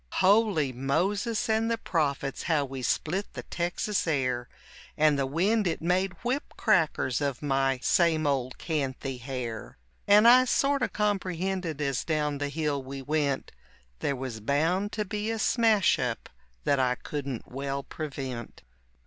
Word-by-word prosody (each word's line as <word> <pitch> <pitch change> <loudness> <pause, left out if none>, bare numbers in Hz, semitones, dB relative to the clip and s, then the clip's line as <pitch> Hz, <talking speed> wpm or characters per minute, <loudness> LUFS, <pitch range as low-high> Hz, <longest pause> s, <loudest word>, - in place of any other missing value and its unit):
Holy 190 - +3
Moses 190 - 0
and 220 +1 +1
the 230 - +1
Prophets, 140 - -1
how 150 -3 +2
we 135 -1 -6
split 175 - -1
the - - -6
Texas 180 +3 -2
air, 125 -5 0 0.5
And 155 0 +5
the 135 - +1
wind 195 +8 +1
it 165 - -1
made 185 +3 +1
whip 255 +4 -2
crackers 160 - +2
of 140 -1 -2
my 135 -2 +1
same 165 -3 +3
old 130 -3 -1
canthy 135 -4 -3
hair, 120 -3 -5 0.3
And 210 +3 +7
I 255 +2 +8
sorta 275 +1 +1
comprehended 190 -5 -1
as 140 -4 0
down 150 -3 -1
the 145 0 -2
hill 150 -1 -1
we 135 +1 -7
went 145 -1 -1 0.5
There 140 - -1
was 130 -3 -5
bound 165 - +1
to 210 -1 -1
be 210 +2 -3
a 225 - -1
smash 220 -3 +3
up 125 -3 -3 0.3
that 140 - +2
I 125 -1 +2
couldn't 140 -3 -5
well 140 +1 -3
prevent. 135 -6 -6
155 Hz, 150 wpm, -28 LUFS, 135-195 Hz, 0.5 s, I